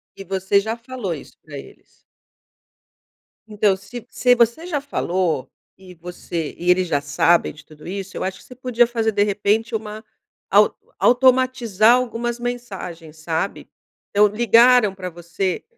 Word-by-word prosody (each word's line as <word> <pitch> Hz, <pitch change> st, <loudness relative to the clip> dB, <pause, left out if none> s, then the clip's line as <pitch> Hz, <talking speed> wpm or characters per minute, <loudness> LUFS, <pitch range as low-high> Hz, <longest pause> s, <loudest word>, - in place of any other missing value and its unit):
E 195 Hz, -, -9 dB
você 190 Hz, +1 st, +1 dB
já 220 Hz, +3 st, -3 dB
falou 235 Hz, -5 st, -5 dB
isso 150 Hz, -, -11 dB
pra 150 Hz, -2 st, -10 dB
eles? -, -, -13 dB, 1.6 s
Então 210 Hz, -2 st, +1 dB
se 205 Hz, +5 st, -10 dB
se 250 Hz, 0 st, +3 dB
você 235 Hz, +7 st, +1 dB
já 330 Hz, -5 st, -2 dB
falou, 180 Hz, -, -2 dB, 0.3 s
e 185 Hz, -1 st, -14 dB
você 170 Hz, -2 st, -6 dB
e 175 Hz, -, -3 dB
eles 180 Hz, 0 st, +3 dB
já 145 Hz, -3 st, 0 dB
sabem 145 Hz, +4 st, +2 dB
de 155 Hz, 0 st, -16 dB
tudo 150 Hz, +1 st, -14 dB
isso, 195 Hz, 0 st, -6 dB
eu -, -, -3 dB
acho 190 Hz, 0 st, -4 dB
que -, -, -17 dB
você 250 Hz, -, -13 dB
podia 245 Hz, -1 st, +2 dB
fazer 225 Hz, -2 st, -1 dB
de 205 Hz, 0 st, +2 dB
repente 210 Hz, +2 st, 0 dB
uma 215 Hz, 0 st, -6 dB, 0.5 s
au -, -, +4 dB, 0.2 s
automatizar 250 Hz, -3 st, +4 dB
algumas 240 Hz, -1 st, -2 dB
mensagens, 195 Hz, -10 st, -6 dB
sabe? 160 Hz, +4 st, -3 dB, 0.4 s
Então 205 Hz, +1 st, +4 dB
ligaram 230 Hz, 0 st, +4 dB
pra 185 Hz, -1 st, -6 dB
você, 175 Hz, +2 st, -4 dB
205 Hz, 150 wpm, -21 LUFS, 180-240 Hz, 1.6 s, au